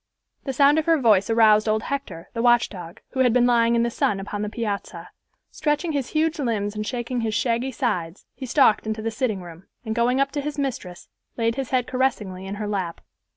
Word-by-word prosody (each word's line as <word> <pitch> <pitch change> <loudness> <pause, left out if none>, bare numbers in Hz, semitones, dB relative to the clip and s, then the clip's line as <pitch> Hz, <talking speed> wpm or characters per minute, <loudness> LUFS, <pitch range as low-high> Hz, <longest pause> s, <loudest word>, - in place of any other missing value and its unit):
The 270 - -2
sound 285 +3 +5
of 315 - -3
her 330 -1 +5
voice 215 -7 +3
aroused 220 -1 +4
old 215 0 +1
Hector, 220 -13 -5
the 230 - -2
watchdog, 220 -6 +1
who 260 - -5
had 250 -2 +4
been 245 -1 +4
lying 235 -1 +3
in 235 - +2
the 235 - -1
sun 205 -3 0
upon 205 +1 -5
the 210 - -2
piazza. 200 -6 -5 0.4
Stretching 295 +2 -1
his 280 -4 -2
huge 315 0 0
limbs 215 -6 -1
and 215 0 -4
shaking 245 0 -3
his 220 -2 -1
shaggy 240 +2 0
sides, 205 - -3
he 260 - -7
stalked 230 -4 +3
into 220 0 -3
the 225 - -1
sitting 220 -5 -2
room, 170 +1 -12 0.2
and 220 - -2
going 240 +3 +1
up 275 0 +1
to 290 - -2
his 300 +1 -5
mistress 245 -11 -4 0.3
laid 230 -1 +1
his 265 0 -4
head 255 -2 +1
caressingly 210 -8 -2
in 195 - -4
her 210 0 -4
lap. 190 -5 -3
230 Hz, 215 wpm, -23 LUFS, 205-260 Hz, 0.4 s, sound